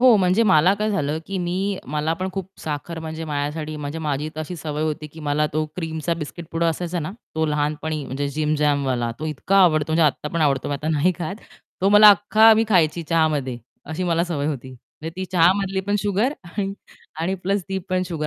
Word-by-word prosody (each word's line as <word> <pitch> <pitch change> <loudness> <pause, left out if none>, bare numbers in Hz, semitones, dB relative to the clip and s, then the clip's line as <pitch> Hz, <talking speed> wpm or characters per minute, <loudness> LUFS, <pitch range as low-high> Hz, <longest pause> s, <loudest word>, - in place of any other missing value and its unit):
हो, 250 -3 +7
म्हणजे 185 +3 +3
मला 190 -3 +5
काय 215 +1 -1
झालं 155 -6 -1
की 195 - -4
मी 185 +3 -1
मला 150 +2 0
पण 185 +3 -3
खूप 190 -1 -4
साखर 155 +2 -4
म्हणजे 160 0 -5
माझ्यासाठी 150 +1 -3
म्हणजे 150 +1 -5
माझी 150 -1 -2
तशी 155 +3 -5
सवय 150 -1 -4
होती 155 0 -2
की 160 - -11
मला 150 0 +1
तो 155 +1 0
क्रीमचा 160 -1 -2
बिस्किट 165 +1 -7
पुडा 165 +1 +1
असायचा 175 +2 -2
ना, 155 - -4 0.2
तो 160 0 +1
लहानपणी 150 0 -1
म्हणजे 140 +2 -3
JIM-JAM 150 -2 +1
वाला 120 -2 0
तो 155 - -2
इतका 155 +6 0
आवडतो, 155 -3 +3
म्हणजे 165 +1 +3
आत्ता 150 +1 -1
पण 170 - -2
आवडतो 140 -4 +1
मी 145 - -1
आता 150 +2 -4
नाही 160 +3 +2
खात 175 +2 -3 0.5
तो 190 - +3
मला 210 +1 +9
अख्खा 215 +3 +6
मी 225 +1 +3
खायची 170 -4 +3
चहामध्ये. 150 -5 0 0.3
अशी 160 +4 -4
मला 170 -1 +1
सवय 155 -5 -2
होती. 135 -4 -4
म्हणजे 140 +5 -10
ती 185 - -3
चहामधली 190 +2 +3
पण 205 0 +2
शुगर 210 +6 +1
आणि 195 +3 -3 0.5
आणि 180 +4 0
प्लस 195 +1 0
ती 190 0 -1
पण 185 -1 +1
शुगर 155 -4 -3
160 Hz, 205 wpm, -22 LUFS, 150-185 Hz, 0.5 s, मला